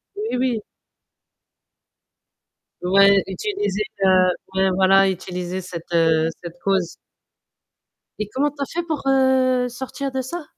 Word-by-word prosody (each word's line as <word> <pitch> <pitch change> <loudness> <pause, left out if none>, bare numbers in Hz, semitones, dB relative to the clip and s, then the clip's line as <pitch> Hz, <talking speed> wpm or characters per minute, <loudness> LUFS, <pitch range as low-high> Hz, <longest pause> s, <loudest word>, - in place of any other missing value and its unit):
Oui, 420 - -3
oui. 250 -3 0 2.2
Ouais, 195 +2 +5
utilisez, 390 - -2 0.2
heu, 185 -1 +5 0.3
ouais 190 0 +3
voilà, 195 +1 +4
utilisez 180 0 -4
cette, 175 -2 -8
heu, 165 -1 +3
cette 170 0 -9
cause. 190 -3 0 1.2
Et 210 - -2
comment 290 +3 +1
tu 285 0 -11
as - - 0
fait 345 +5 -4
pour, 315 -4 -4
heu, 260 -2 +3
sortir 265 +3 -5
de 260 0 -2
ça? 315 +5 -6
200 Hz, 125 wpm, -21 LUFS, 185-265 Hz, 2.2 s, Ouais